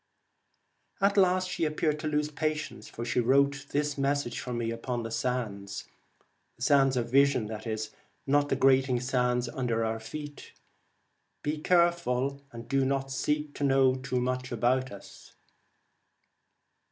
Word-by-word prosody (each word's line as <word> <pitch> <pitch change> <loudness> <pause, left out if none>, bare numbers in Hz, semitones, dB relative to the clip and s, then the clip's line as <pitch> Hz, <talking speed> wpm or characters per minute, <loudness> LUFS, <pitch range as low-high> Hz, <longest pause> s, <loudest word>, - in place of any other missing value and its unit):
At 200 +1 +3
last 185 -1 +3
she 180 -2 -3
appeared 155 -1 0
to 155 - -3
lose 150 0 0
patience, 155 0 -3
for 115 - -6
she 120 - 0
wrote 140 +3 +2
this 145 -1 -1
message 140 -3 0
for 125 - -5
me 120 -1 -2
upon 120 +1 -3
the 115 - -5
sands 105 -5 -3 0.3
— - - -41
the 120 - -8
sands 135 -2 +4
of 120 -1 -2
vision, 140 -3 +4 0.8
not 145 +1 +2
the - - +2
grating 130 -2 +3
sands 125 -1 0
under 120 -3 -1
our 110 0 -2
feet 145 +5 -8 0.3
— - - -45
' - - -48
Be 150 +1 -2
careful, 155 -6 +2
and 115 -1 -9
do 135 -1 +2
not 135 0 -1
seek 150 +2 -1
to - - -5
know 135 -1 +4
too 130 0 -2
much 130 +1 -2
about 125 +2 +1
us.' 100 - -13
135 Hz, 155 wpm, -29 LUFS, 125-145 Hz, 0.8 s, sands